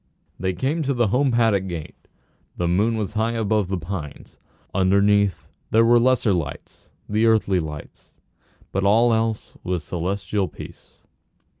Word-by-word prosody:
They 95 +1 -1
came 140 - -1
to 140 -2 -1
the 120 -3 +2
home 135 +6 +2
paddock 110 -5 +2
gate. 85 -4 -8 0.5
The 90 - 0
moon 105 +6 +1
was 105 -3 -3
high 110 +2 0
above 110 -3 0
the 95 0 -2
pines. 85 -4 -7 0.3
Underneath 100 0 +2 0.2
there 115 +1 +4
were 120 +1 +5
the 120 - +2
lesser 130 -5 +3
lights, 85 -6 -6 0.2
the 110 +2 +2
earthly 105 -4 +3
lights, 75 -3 -9 0.6
but 95 - -1
all 115 +4 +4
else 110 -1 -1
was 90 -3 -2
celestial 95 +3 -2
peace. - - -13
100 Hz, 150 wpm, -22 LUFS, 95-115 Hz, 0.6 s, were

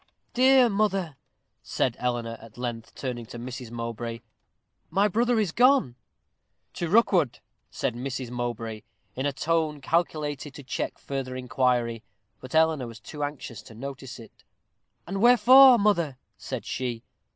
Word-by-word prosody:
"Dear 260 0 +6
mother," 195 -7 0 0.5
said 125 -3 -1
Eleanor, 120 -2 -2
at 115 0 -14
length, 120 -2 -5
turning 120 -4 -5
to 120 - -9
Mrs. 125 0 -7
Mowbray, 115 0 -5 0.7
"my 195 +5 +3
brother 235 +3 +2
is 205 -6 0
gone 245 - +4 0.4
" - - -50
"To 170 - -3
Rookwood," 185 - +3 0.3
said - - -2
Mrs. 130 0 -5
Mowbray, 115 -3 -4 0.3
in 130 +3 -1
a - - 0
tone 155 +1 0
calculated 150 -2 -1
to 145 - -9
check 130 - -4
further 135 -2 -5
inquiry; 125 -2 0 0.4
but 130 - -8
Eleanor 160 -5 +3
was 115 -1 -10
too 150 +6 -7
anxious 145 -5 -5
to 110 - -14
notice 135 +1 -7
it. 115 -2 -15 0.6
"And 195 +2 -4
wherefore, 250 +2 +8
mother?" 170 - +1 0.2
said - - -6
she. 120 -3 -3
135 Hz, 140 wpm, -26 LUFS, 120-175 Hz, 0.7 s, wherefore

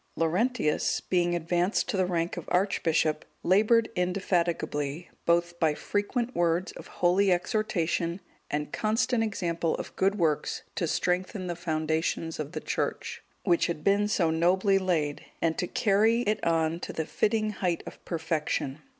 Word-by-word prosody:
Laurentius, 175 +2 +1
being 175 -1 +1
advanced 175 +3 0
to - - -1
the 185 -1 +2
rank 170 -1 -1
of 175 - -6
archbishop, 165 -5 +1 0.2
laboured 220 +5 +4
indefatigably, 175 -4 -1 0.2
both 170 0 +2
by 155 -2 +2
frequent 230 - -2
words 175 +1 +1
of - - -11
holy 185 +2 +2
exhortation 175 -3 0 0.3
and 150 0 -3
constant 225 +2 +1
example 170 -6 -1
of - - -7
good 195 +2 +2
works 160 -6 0
to 170 - -1
strengthen 185 +3 -1
the 175 -1 -3
foundations 160 -1 -1
of 150 -1 -4
the - - -3
Church, - - -3 0.2
which 175 -3 +3
had 165 -3 -4
been 200 +1 +3
so 175 -6 +2
nobly 185 +4 +3
laid, 160 -6 -1 0.2
and 165 -1 +1
to 180 - 0
carry 225 0 +3
it 215 -2 -1
on 165 0 +1
to - - -5
the 160 - -3
fitting 215 +5 0
height 180 -4 -1
of - - -10
perfection. 160 -4 -2
175 Hz, 150 wpm, -28 LUFS, 165-200 Hz, 0.3 s, laboured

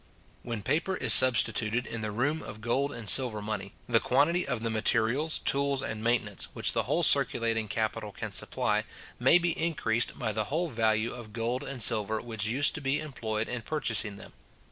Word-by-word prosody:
When 115 -4 -6
paper 165 - -1
is - - +5
substituted 120 -2 +5
in 115 - -7
the 110 - -3
room 140 +9 -2
of 110 - -10
gold 130 +6 -1
and 115 -6 -8
silver 120 -2 +4
money, 105 -2 -6
the 115 -2 +3
quantity 150 +10 +1
of 125 -4 -3
the 115 - -2
materials, 115 +7 +1
tools, 140 -1 0
and 110 0 -5
maintenance, 115 -4 0
which - - +2
the - - +1
whole - - +1
circulating 115 -1 +3
capital 110 0 -3
can - - -7
supply, - - -1 0.4
may 130 +7 +5
be 175 -1 0
increased 150 -9 -1
by 110 - -2
the 105 0 -2
whole 165 +7 -2
value 110 -2 0
of 115 -3 -11
gold 120 +4 -3
and 135 -5 -2
silver 110 0 +2
which 110 -2 -3
used 135 +6 +3
to 160 - -6
be 135 +2 -1
employed 115 -7 -4
in 125 -1 -5
purchasing 115 -6 -1
them. - - -13
115 Hz, 190 wpm, -28 LUFS, 110-140 Hz, 0.4 s, is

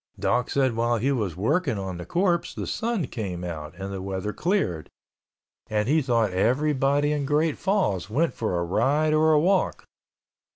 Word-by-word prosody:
Doc 120 +1 0
said 130 -4 +1
while 120 +1 +1
he 130 +6 0
was 105 - -1
working 140 - +1
on 95 -2 -4
the 90 0 -8
corpse 175 -1 0
the - - -4
sun 225 -7 -1
came 95 -8 -5
out 80 -2 -6
and 100 0 -5
the 95 - -5
weather 95 +2 -3
cleared 160 - -1 0.8
and 105 0 0
he 155 +4 +3
thought 115 -6 +1
everybody 140 +7 +2
in 150 -1 -1
Great 150 +3 +1
Falls 185 - 0
went 155 +9 +1
for 110 -6 -2
a 85 - 0
ride 150 - +2
or 155 0 +4
walk. 185 +5 +1
125 Hz, 170 wpm, -25 LUFS, 95-155 Hz, 0.8 s, or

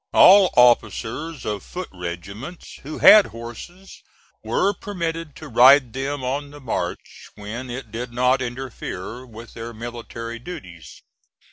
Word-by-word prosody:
All 195 0 +8
officers 125 +5 +2
of 105 -2 -3
foot 185 +1 -7
regiments 95 - -8
who 150 +3 -7
had 215 -1 +8
horses 120 - -11 0.4
were 200 - +1
permitted 165 -5 -5
to 155 - -10
ride 130 0 +6
them 135 +1 -3
on 140 +3 -3
the 145 +1 -12
march 110 -9 -5
when 110 +5 -7
it 120 -2 -7
did 120 +2 -5
not 125 +2 +2
interfere 125 -2 -6
with 115 0 -12
their 115 0 -8
military 115 0 -7
duties. 90 - -10
125 Hz, 130 wpm, -22 LUFS, 115-145 Hz, 0.4 s, All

